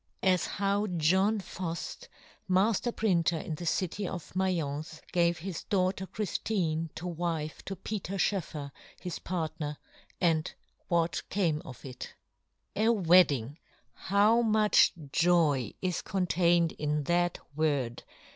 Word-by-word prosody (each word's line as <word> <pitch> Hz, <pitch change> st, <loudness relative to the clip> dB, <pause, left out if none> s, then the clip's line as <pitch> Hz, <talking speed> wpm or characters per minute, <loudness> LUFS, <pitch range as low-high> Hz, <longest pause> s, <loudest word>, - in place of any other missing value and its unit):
As 185 Hz, -2 st, +3 dB
how 200 Hz, +1 st, 0 dB
"John 190 Hz, +5 st, +2 dB
Fuji, 185 Hz, -, -5 dB, 0.4 s
majler 210 Hz, +5 st, +2 dB
printer 175 Hz, -6 st, +2 dB
in 160 Hz, -, -4 dB
the 170 Hz, +3 st, -5 dB
city 185 Hz, +3 st, -1 dB
of 175 Hz, -3 st, -7 dB
Ma'ience, 160 Hz, -4 st, -2 dB
gave 170 Hz, -1 st, +2 dB
his 180 Hz, 0 st, -5 dB
daughter 190 Hz, -1 st, 0 dB
Chrijfine 180 Hz, -6 st, -1 dB
to 170 Hz, -, -6 dB
wife 165 Hz, -3 st, -3 dB
to 195 Hz, -, -4 dB
Peter 195 Hz, -1 st, -4 dB
Schoeffer 155 Hz, -8 st, -1 dB, 0.3 s
his 180 Hz, -2 st, -5 dB
partner, 160 Hz, -4 st, -3 dB, 0.4 s
and 160 Hz, -3 st, +2 dB, 0.4 s
what 170 Hz, -1 st, +1 dB
came 165 Hz, -6 st, +1 dB
of 130 Hz, -, -11 dB
it. 125 Hz, -2 st, -8 dB, 0.6 s
WEDDING! 175 Hz, -, +4 dB, 0.3 s
how 210 Hz, +4 st, +3 dB
much 215 Hz, -2 st, +4 dB, 0.2 s
joy 160 Hz, -, +3 dB
is 180 Hz, -2 st, 0 dB
contained 175 Hz, -3 st, +2 dB
in 150 Hz, 0 st, -1 dB
that 175 Hz, +3 st, +1 dB, 0.2 s
word 140 Hz, -6 st, 0 dB
175 Hz, 120 wpm, -30 LUFS, 155-190 Hz, 0.6 s, WEDDING